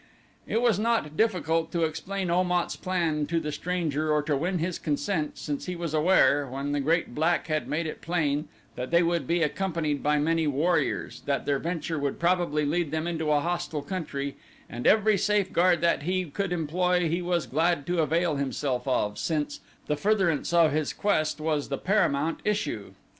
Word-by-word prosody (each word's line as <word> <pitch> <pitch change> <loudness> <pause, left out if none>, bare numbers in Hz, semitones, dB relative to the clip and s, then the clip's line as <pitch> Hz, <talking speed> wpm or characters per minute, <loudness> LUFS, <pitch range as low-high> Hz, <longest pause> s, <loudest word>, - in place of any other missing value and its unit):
It 230 - 0
was 225 -5 +3
not 220 -9 0
difficult 165 -6 +1
to 170 -1 +1
explain 180 +4 -2
Om 180 +1 +2
at's 175 -1 0
plan 165 -5 -1
to 165 0 0
the 150 -2 -4
stranger 155 -3 -1
or 150 -1 +2
to 150 -1 0
win 175 +6 -1
his 170 +1 -2
consent 155 +1 -2
since 145 +2 -4
he 180 - -3
was 170 -2 -4
aware, 145 -4 +4
when 135 +2 -4
the 145 - 0
great 160 -1 +1
black 160 +5 +1
had 155 -1 -1
made 160 +2 -1
it 155 - -6
plain 155 -3 0 0.3
that 125 +1 -4
they 170 +1 +4
would 170 -5 0
be 170 0 +2
accompanied 155 -3 -1
by 150 0 +2
many 160 +1 +1
warriors, 160 +5 0
that 140 -1 0
their 140 -1 +1
venture 165 -1 -3
would 140 -1 -2
probably 170 -4 +1
lead 165 +2 0
them 160 +2 -2
into 160 -3 -1
a 145 -1 +3
hostile 165 -3 -2
country 140 -7 -4 0.3
and 120 +1 -3
every 215 -2 +4
safeguard 185 -4 +2
that 170 -3 +2
he 185 +4 -1
could 185 +5 -3
employ 180 +1 +1
he 170 +3 -1
was 175 -2 0
glad 160 0 +1
to 175 0 +1
avail 160 0 +1
himself 135 -1 -2
of, 105 -5 0
since 155 -3 -2 0.3
the 150 - 0
furtherance 190 -3 +1
of 170 -2 +5
his 150 0 -1
quest 155 -7 0
was 155 -2 -1
the 140 - -2
paramount 165 -6 +1
issue. 145 - -2
165 Hz, 185 wpm, -27 LUFS, 150-180 Hz, 0.3 s, of